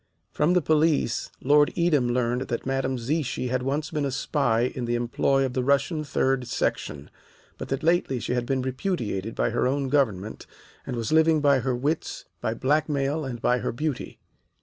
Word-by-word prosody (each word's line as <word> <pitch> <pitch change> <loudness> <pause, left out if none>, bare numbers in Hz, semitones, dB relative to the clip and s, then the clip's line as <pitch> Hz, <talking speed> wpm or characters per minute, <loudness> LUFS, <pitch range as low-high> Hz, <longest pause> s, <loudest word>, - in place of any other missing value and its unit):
From 150 +4 +2
the 180 -3 +3
police 155 -6 +2
Lord 145 +2 +5
Edam 155 -8 +2
learned 125 +1 0
that 120 - -3
Madame 135 0 -1
Zichy 130 0 -2
had 130 0 0
once 145 +5 -2
been 150 -3 -1
a 140 - 0
spy 130 -3 0
in 125 0 -2
the 120 0 0
employ 135 +3 +1
of 130 - -3
the 130 - 0
Russian 140 +4 +1
Third 135 -3 0
Section, 70 -1 -2 0.5
but - - -5
that 135 +1 -3
lately 165 -6 +2
she 120 - -2
had 120 -1 -1
been 130 -1 0
repudiated 125 - -3
by - - 0
her 120 +2 +1
own 135 0 -1
government 110 -8 0 0.4
and 130 - -3
was 115 +1 -3
living 160 0 +5
by 140 -2 +4
her 130 0 -1
wits, 145 +6 -2 0.2
by 110 - -1
blackmail, 145 +2 0
and 125 -3 -5
by 125 0 +3
her - - -2
beauty. 150 +2 -4
135 Hz, 185 wpm, -25 LUFS, 125-150 Hz, 0.5 s, Lord